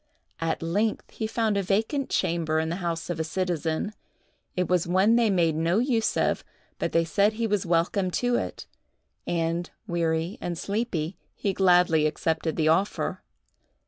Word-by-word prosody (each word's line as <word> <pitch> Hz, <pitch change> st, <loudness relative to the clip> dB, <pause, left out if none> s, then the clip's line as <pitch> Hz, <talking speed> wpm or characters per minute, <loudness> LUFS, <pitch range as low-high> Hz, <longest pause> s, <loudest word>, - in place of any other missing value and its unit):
At 165 Hz, 0 st, -1 dB
length 205 Hz, +7 st, -1 dB
he 220 Hz, -, -3 dB
found 220 Hz, -2 st, 0 dB
a -, -, +2 dB
vacant 220 Hz, +9 st, 0 dB
chamber 165 Hz, -2 st, 0 dB
in 160 Hz, 0 st, -1 dB
the 170 Hz, -, -2 dB
house 170 Hz, -2 st, -3 dB
of 165 Hz, -, -4 dB
a -, -, +1 dB
citizen. 170 Hz, +2 st, -2 dB, 0.6 s
It 180 Hz, -1 st, 0 dB
was 180 Hz, -2 st, +1 dB
one 190 Hz, +6 st, +4 dB
they 235 Hz, -2 st, +4 dB
made 170 Hz, -5 st, +2 dB
no 165 Hz, +4 st, +1 dB
use 235 Hz, -2 st, +1 dB
of, -, -, +1 dB, 0.4 s
but -, -, -1 dB
they 165 Hz, 0 st, +3 dB
said 200 Hz, +6 st, +2 dB
he 230 Hz, +1 st, -1 dB
was 205 Hz, -4 st, 0 dB
welcome 175 Hz, +3 st, +1 dB
to 245 Hz, 0 st, +1 dB
it; -, -, -3 dB, 0.6 s
and, 170 Hz, +1 st, -1 dB, 0.2 s
weary 165 Hz, +2 st, -1 dB
and 175 Hz, -1 st, -3 dB
sleepy, 200 Hz, -6 st, -2 dB, 0.2 s
he 200 Hz, -, -1 dB
gladly 180 Hz, -5 st, +4 dB
accepted 160 Hz, +1 st, -1 dB
the 155 Hz, -1 st, +1 dB
offer. 175 Hz, +6 st, +1 dB
175 Hz, 165 wpm, -26 LUFS, 165-205 Hz, 0.6 s, one